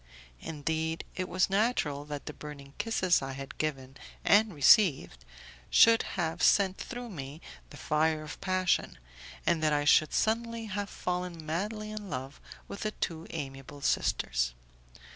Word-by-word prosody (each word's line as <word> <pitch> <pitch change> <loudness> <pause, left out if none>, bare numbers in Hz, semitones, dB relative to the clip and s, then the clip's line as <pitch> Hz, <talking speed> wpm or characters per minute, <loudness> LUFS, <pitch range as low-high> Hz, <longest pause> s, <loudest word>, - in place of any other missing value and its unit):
Indeed, 160 - -2
it 185 -1 -3
was 185 +1 +2
natural 195 -9 0
that 145 -1 -6
the 150 - -6
burning 140 -2 -10
kisses 210 -5 +2
I 135 0 -4
had 135 0 -8
given 135 -3 -3 0.3
and 215 +1 +5
received 145 - +4 0.5
should 230 0 +7 0.2
have 165 -1 -1
sent 195 -2 +4
through 245 -1 -6
me 140 -3 -7 0.3
the 145 - -12
fire 155 +2 +1
of 150 - -9
passion, 185 -1 +1 0.5
and 170 -2 +2
that 155 -1 +2
I 145 0 +1
should 155 +1 +5
suddenly 230 +1 0
have 205 -1 -4
fallen 180 -2 -4
madly 210 +7 -3
in 210 -2 -7
love 135 +1 -6 0.3
with 200 - -7
the 215 - -1
two 165 -2 -4
amiable 140 -2 -7
sisters. 60 - 0
160 Hz, 145 wpm, -30 LUFS, 145-200 Hz, 0.5 s, should